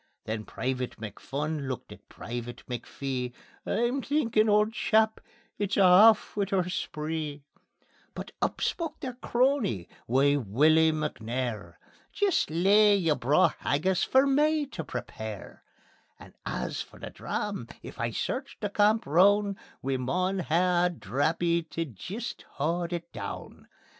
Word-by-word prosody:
Then 110 0 -3
Private 130 -1 -3
McPhun 140 +7 -4
looked 130 -2 -5
at - - -14
Private 120 +1 -7
McPhee: 125 0 -4 0.3
"I'm 240 +4 +1
thinkin' 230 -7 +2
auld 210 +1 +3
chap, 220 -1 +2 0.4
it's 200 -2 -1
a' 200 - +6
aff 210 +4 +6
wi' 200 -1 0
oor 185 -3 +1
spree." 155 -4 -4 0.7
But - - -7
up - - -1
spoke 330 -3 -2
their 255 -3 -4
crony, 240 - 0 0.2
wee 140 +4 +3
Wullie 155 +8 +4
McNair: 120 - -3 0.4
"Jist 405 -4 +1
lea' 200 +6 +5
yer 165 -6 +2
braw 145 +1 +3
haggis 185 +6 +1
for 265 +1 +4
me 300 +2 +3
tae 255 - -6
prepare; 110 -7 -7 0.5
And - - -14
as - - -3
for - - -11
the - - -8
dram, 200 - -4 0.2
if - - -10
I 115 - 0
search 260 - -3
the 205 -2 -3
camp 210 +2 +3
roun', 200 +6 +4 0.3
We 135 0 0
maun 180 +9 0
hae 175 +1 +2
a - - +3
drappie 165 - 0
tae 165 - -2
jist 195 - -6
haud 170 +4 -1
it 170 -1 -5
doon. - - -7
170 Hz, 140 wpm, -28 LUFS, 135-210 Hz, 0.7 s, a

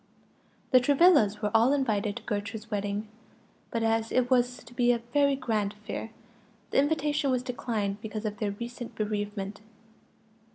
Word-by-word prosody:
The 255 - +8
Travillas 260 - +4
were 210 - +1
all 230 +5 +5
invited 215 -7 0
to - - -7
Gertrude's 215 +1 -4
wedding; 205 +1 -2 0.6
but 230 -1 -1
as 225 0 +1
it 250 0 +1
was 245 -1 +2
to 240 0 -15
be 245 0 +3
a 240 - +2 0.2
very 280 -1 +4
grand 215 -6 -1
affair, 210 +1 -6 0.6
the - - +3
invitation 295 0 +1
was 250 -1 +1
declined 215 -5 -2
because 220 0 -5
of 210 0 -3
their 210 - 0
recent 235 +3 -7
bereavement. 205 -1 -3
225 Hz, 155 wpm, -28 LUFS, 210-250 Hz, 0.6 s, The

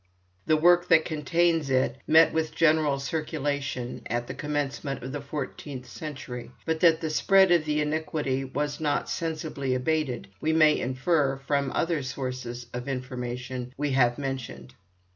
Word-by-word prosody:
The 155 - +4
work 175 +2 +5
that 160 -2 +5
contains 165 0 +1
it 130 -1 +2
met 160 +1 +6
with 160 -1 -1
general 155 -3 +3
circulation 140 -4 -3
at 120 +1 -2
the - - -6
commencement 145 -2 -3
of 130 - -5
the 145 +1 -4
fourteenth 140 -2 -6
century, 135 -3 -7 0.2
but 160 -1 0
that 165 -1 +5
the 160 - -2
spread 190 +3 +5
of 170 -3 +4
the 150 0 +1
iniquity 150 -3 -1
was 145 +2 -3
not 150 -2 0
sensibly 155 -5 -2
abated 130 -1 -1
we 160 +1 +1
may 155 -1 +5
infer 135 +2 +1
from 140 0 -1
other 165 -3 0
sources 130 -2 -5
of 125 +2 -5
information 125 0 -5
we 145 0 -1
have 120 -2 +3
mentioned. 135 -3 -5
145 Hz, 150 wpm, -27 LUFS, 130-160 Hz, 0.2 s, met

